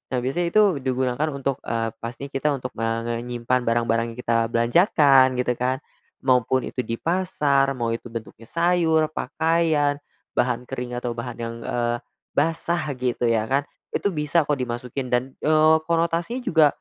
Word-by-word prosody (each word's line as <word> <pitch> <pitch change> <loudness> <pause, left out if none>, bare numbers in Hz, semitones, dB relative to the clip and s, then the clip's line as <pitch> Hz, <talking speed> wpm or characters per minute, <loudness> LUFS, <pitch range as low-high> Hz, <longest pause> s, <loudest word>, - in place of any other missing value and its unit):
Nah, 125 - -1
biasanya 170 +7 0
itu 195 -4 +3
digunakan 130 +2 0
untuk, 135 -1 -2
eee, 115 -1 -2
pasti 120 +5 -7
kita 145 +2 0
untuk, 125 -2 -6
eee, 115 0 -1
menyimpan 120 +1 -2
barang-barang 115 0 +2
yang - - -12
kita 115 -2 +1
belanjakan 130 - +4
gitu 125 0 0
kan. 130 +1 -1 0.3
Maupun 130 -1 +2
itu 125 - -3
di 115 -1 -4
pasar 150 -6 +1
mau 115 -1 -1
itu 115 +1 -6
bentuknya 115 0 -8
sayur, 170 -2 +3
pakaian, 155 -1 +1 0.3
bahan 125 0 0
kering 125 -2 -4
atau 120 -1 -3
bahan 120 0 -6
yang, 115 0 -4
eee, 120 0 -1 0.4
basah 165 +3 +1 0.2
gitu 125 -1 -1
ya 110 -2 +2
kan, 135 +3 +2 0.3
itu 200 - +1
bisa 150 +1 +1
kok 145 0 0
dimasukin 125 +1 -4
dan, 125 0 +3
eee, 155 +1 +4
konotasinya 170 +8 0
juga, 160 - +4
130 Hz, 155 wpm, -24 LUFS, 120-155 Hz, 0.4 s, belanjakan